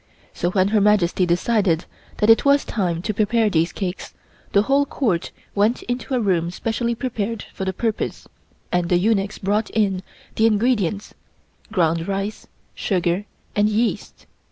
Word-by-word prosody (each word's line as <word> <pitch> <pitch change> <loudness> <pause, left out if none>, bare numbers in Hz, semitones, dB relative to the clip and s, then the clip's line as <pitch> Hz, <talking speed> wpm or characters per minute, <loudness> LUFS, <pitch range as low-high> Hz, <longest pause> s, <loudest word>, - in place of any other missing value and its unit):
So 175 - -1
when 185 +1 +2
Her 215 -1 +3
Majesty 195 -3 +3
decided 180 -1 +1 0.3
that 210 - +2
it 225 - +5
was 280 0 +4
time 175 -6 -1
to 215 - -1
prepare 215 +1 +2
these 165 0 +2
cakes 190 -2 -5 0.4
the 200 - +4
whole 275 +4 +3
Court 190 -11 -1 0.2
went 210 +4 +1
into 245 +1 -3
a - - +2
room 180 -6 +1
specially 230 +5 -2
prepared 230 -3 -3
for 190 - -4
the 190 - 0
purpose 220 +3 -3 0.4
and 175 -1 0
the 175 - +4
eunuchs 200 +1 +1
brought 205 +2 0
in 195 -4 +1 0.4
the 220 - +5
ingredients 210 -3 0 0.6
ground 165 -4 +1
rice, 200 +2 -3 0.3
sugar 180 0 0 0.3
and 210 0 +3
yeast. 220 +2 -2
205 Hz, 155 wpm, -22 LUFS, 180-225 Hz, 0.6 s, it